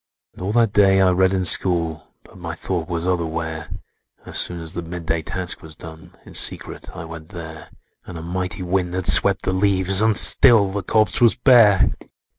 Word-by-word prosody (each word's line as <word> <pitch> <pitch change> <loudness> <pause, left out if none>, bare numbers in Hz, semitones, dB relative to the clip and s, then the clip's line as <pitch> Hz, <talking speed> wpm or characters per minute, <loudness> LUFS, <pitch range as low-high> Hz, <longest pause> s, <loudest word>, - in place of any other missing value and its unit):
"And - - -15
all 95 +2 -4
that 115 -3 0
day 95 -2 +2
I 95 -1 +2
read 95 +1 +1
in 95 -1 -2
school, 85 -3 +4 0.2
But 95 - -19
my 85 -1 -8
thought 85 0 -6
was 85 -1 -5
otherwhere; 80 -2 -5 0.6
As - - 0
soon 90 -1 0
as 80 0 -7
the 85 - -5
midday 85 -1 -5
task 90 +3 -5
was 80 -1 -12
done, 80 0 -14
In - - -15
secret - - 0
I 90 -2 -9
went 80 -1 -12
there: 80 -4 -11 0.4
And 90 - -10
a 80 - -9
mighty 90 +2 -5
wind 90 0 -3
had 95 -1 -4
swept 100 +1 +3
the 95 - -3
leaves, 95 0 -1
And 110 -1 +1
still 110 -6 +5
the 100 +1 -5
corpse 110 +1 -1
was 120 -2 +3
bare! 115 -6 +3
90 Hz, 195 wpm, -19 LUFS, 80-95 Hz, 0.6 s, still